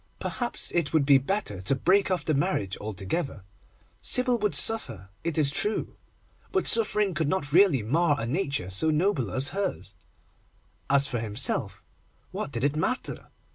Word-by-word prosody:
Perhaps, 240 -1 -3
it 170 -4 -1
would 155 -3 +3
be 140 -1 +6
better 135 - -3
to 95 +9 0
break 190 +9 +2
off 185 -1 -1
the 155 - +1
marriage 140 - -1
altogether. 105 - -4 0.6
Sybil 250 -1 +1
would 210 -1 +1
suffer, 115 - +3
it 165 -2 -2
is 145 -3 +3
true, 210 +8 -1 0.6
but 380 - 0
suffering 210 -4 +2
could 155 -2 -1
not 145 -6 -2
really 170 - +4
mar 150 +7 +1
a 115 - -2
nature 140 - -2
so 130 +12 +4
noble 155 - 0
as 130 +9 0
hers. 185 - -4 1.0
As 140 0 +4
for 125 -4 -2
himself, 110 +3 -2 0.5
what 145 - -5
did 115 -2 -4
it 145 +1 +1
matter? 255 - -2
150 Hz, 160 wpm, -26 LUFS, 125-190 Hz, 1.0 s, be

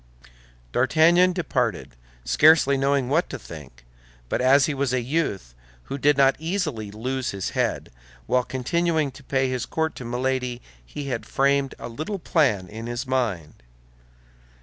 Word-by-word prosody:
D'Artagnan 165 - +4
departed, 175 - -2 0.3
scarcely 150 -2 +5
knowing 135 -1 +1
what 155 +6 +1
to 135 - -5
think, 75 - -12 0.4
but - - -1
as 135 +2 +5
he 155 - -1
was 135 -2 -1
a 130 - +1
youth 120 - -2 0.3
who 140 - -6
did 145 +1 +3
not 135 -1 +5
easily 160 - -3
lose 130 +5 -3
his 100 -1 -4
head, - - -2 0.3
while 125 - +2
continuing 155 +4 0
to 135 +2 -15
pay 135 0 0
his 130 -2 -3
court 160 0 -1
to 130 - -7
Milady, 125 0 -2 0.2
he 140 - -7
had 125 -3 -3
framed 140 0 +1
a - - -7
little 155 - -5
plan 140 - +1
in 110 +4 -8
his 120 +3 -4
mind. 110 - -2
135 Hz, 150 wpm, -24 LUFS, 120-150 Hz, 0.4 s, scarcely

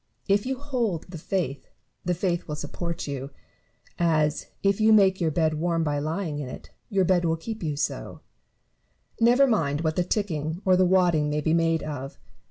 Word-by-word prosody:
If 205 +3 +2
you 265 0 -1
hold 240 - -2
the 165 - -7
faith, 165 -5 -3 0.3
the 180 0 0
faith 175 -1 -1
will 150 - -3
support 170 +3 -4
you; 140 -1 -5 0.7
as, 155 -3 +1 0.2
if 200 +1 +2
you 220 +1 +5
make 195 -3 +5
your 165 - +2
bed 155 0 +1
warm 165 0 +1
by 145 -2 0
lying 155 0 -3
in 135 -3 -5
it, - - -10 0.2
your 195 -4 +2
bed 180 -1 +3
will 165 -1 +1
keep 220 +7 -6
you 155 -4 -2
so: 140 - -3 1.0
never 240 +4 +5
mind 155 - +1
what 160 -1 0
the 180 - +2
ticking 170 -5 -2
or 185 -1 +5
the 185 0 +4
wadding 175 -5 +3
may 150 0 0
be 160 +2 +1
made 165 -1 +2
of. 140 -3 -6
170 Hz, 185 wpm, -26 LUFS, 150-195 Hz, 1.0 s, you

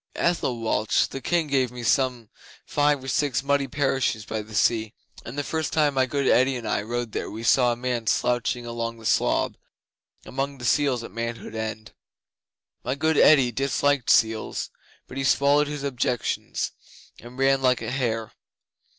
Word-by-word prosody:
Ethelwalch 115 -10 0
the 135 - -6
King 170 +5 +1
gave 135 -4 0
me 125 -1 -8
some 125 -3 0 0.3
five 145 -2 +1
or - - -8
six 140 -1 0
muddy 140 0 +1
parishes 130 -5 0
by 110 - -3
the 110 0 -11
sea, 110 0 +1 0.3
and 120 +5 -8
the 145 - -1
first 160 +1 -3
time 150 -2 +3
my 130 -1 +2
good 140 +1 -1
Eddi 130 +2 +4
and 115 -2 -6
I - - 0
rode 120 +1 -4
there - - -4
we 110 +2 -7
saw 120 +1 +4
a - - -1
man 120 -2 -3
slouching 120 +2 0
along 115 0 -4
the 115 - -13
slob, - - +1 0.7
among 135 +2 -3
the 120 - -7
seals 135 -3 +2
at 115 - -9
Manhood 115 +1 -5
End. 110 0 -5 0.9
My 130 - -1
good 160 +3 +1
Eddi 135 -6 +6
disliked 140 +1 0
seals 110 -1 +2 0.4
but 130 - -9
he 135 - -1
swallowed 140 +2 +3
his 145 -1 -5
objections 125 -3 -2 0.5
and 120 +2 -12
ran 135 0 +3
like 130 -1 +2
a - - -3
hare. 115 -4 -2
125 Hz, 170 wpm, -25 LUFS, 115-140 Hz, 0.9 s, Eddi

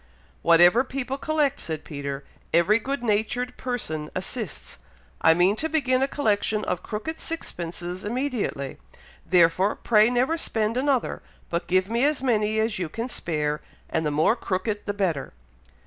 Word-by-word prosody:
"Whatever 175 +8 +6
people 270 +1 -4
collect," 295 -2 +1
said 160 -2 -5
Peter, 140 -2 -5 0.3
"every 185 +7 +4
good 270 +2 -3
natured 235 +3 0
person 160 -12 -4
assists. - - -5 0.4
I 160 - +6
mean 180 +4 +4
to 320 - -1
begin 265 -5 +2
a 270 - +3
collection 215 -6 0
of 180 -1 -1
crooked 220 +12 -5
sixpences 175 - -5
immediately; 230 - -2 0.5
therefore, 180 +3 +4
pray 215 -1 +4
never 255 +7 +1
spend 220 -5 -1
another, 265 -1 0 0.3
but 170 0 -1
give 185 +1 +2
me 235 +3 0
as 290 -2 +2
many 215 -3 +2
as 220 -1 0
you 175 -4 -2
can 230 +8 -4
spare; 150 -7 -1 0.3
and 160 - +1
the 150 - +1
more 155 +9 +3
crooked 205 -1 -3
the 205 - 0
better." 175 -9 -1
215 Hz, 150 wpm, -25 LUFS, 175-255 Hz, 0.5 s, Whatever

